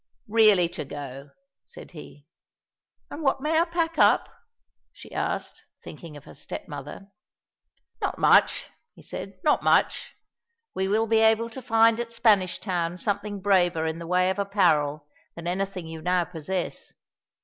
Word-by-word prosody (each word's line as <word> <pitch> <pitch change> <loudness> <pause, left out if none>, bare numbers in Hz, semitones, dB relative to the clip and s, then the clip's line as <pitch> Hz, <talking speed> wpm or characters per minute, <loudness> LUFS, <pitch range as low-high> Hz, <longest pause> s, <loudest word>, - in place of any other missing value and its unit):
"Really 210 -5 +5
to 175 - -6
go," 140 0 -8 0.4
said - - -13
he. 150 -3 -13 0.9
"And 295 - -7
what 270 -3 +1
may 310 +3 +1
I 335 - +3
pack 335 -1 -2
up?" - - +4 0.6
she - - -15
asked, - - -3 0.2
thinking 160 -3 -10
of 145 - -14
her - - -13
step - - -8
mother. 150 +7 -9 0.9
"Not - - -2
much," - - +3 0.3
he - - -16
said, 195 - -8
"not 300 - +3
much. - - +1 0.6
We 190 0 -1
will 215 +3 +1
be 225 0 +2
able 225 +1 +3
to 265 - -8
find 225 -1 +3
at 235 -1 -5
Spanish 205 -6 +3
Town 175 -3 -3
something 205 +1 -3
braver 175 -5 +2
in 160 +1 -3
the 170 - -8
way 180 +1 +2
of 190 - -5
apparel 155 -8 +1 0.3
than 170 - -9
anything 185 0 -3
you 160 0 -8
now 180 +1 +1
possess. 175 +2 -5
190 Hz, 155 wpm, -25 LUFS, 165-225 Hz, 0.9 s, Really